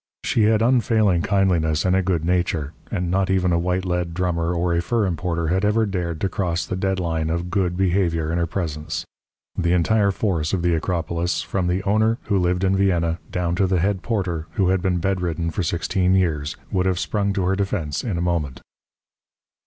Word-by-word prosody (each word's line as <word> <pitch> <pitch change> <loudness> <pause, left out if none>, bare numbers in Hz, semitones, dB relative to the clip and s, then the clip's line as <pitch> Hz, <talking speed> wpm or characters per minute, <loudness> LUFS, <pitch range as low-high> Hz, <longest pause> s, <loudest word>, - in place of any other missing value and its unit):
She 110 - +2
had 110 0 +3
unfailing 110 -7 +3
kindliness 85 -5 +1
and 90 0 +3
a 95 - +3
good 90 -3 -1
nature; 85 -4 0 0.2
and 90 -3 -2
not 95 0 +1
even 90 -2 +2
a 85 - +2
white 90 +2 -1
lead 90 -2 -2
drummer 85 -2 0
or 85 0 0
a 85 - +1
fur 110 +5 0
importer 85 -2 -1
had 95 +3 +1
ever 110 +2 +3
dared 90 -5 -3
to - - +2
cross 85 -3 -2
the 95 - -3
dead 95 0 -1
line 80 -2 -1
of 85 +2 -2
good 90 -2 0
behaviour 85 -4 +1
in 85 - 0
her 85 - 0
presence. 80 -4 -4 0.5
The 85 +1 +1
entire 100 +4 +3
force 90 -6 -1
of 90 -3 0
the 85 -1 +2
Acropolis, 85 +1 -1
from 95 -2 -2
the 90 +2 0
owner, 110 +3 +2
who 100 -2 +1
lived 90 +1 +1
in 95 0 +2
Vienna, 85 -4 +1
down 90 -3 -1
to 95 - +3
the 95 0 +1
head 95 +2 0
porter, 90 -8 -2
who 95 -4 +2
had 95 -1 +2
been 95 -1 +1
bedridden 85 -2 -1
for 80 - -2
sixteen 90 +2 +1
years, 75 -6 0
would 95 -1 +1
have 95 -1 +1
sprung 100 +2 -1
to 100 -2 -1
her 95 +1 +2
defence 95 -7 -2
in 105 -8 -2
a - - -1
moment. 85 -7 -1
90 Hz, 205 wpm, -22 LUFS, 85-95 Hz, 0.5 s, had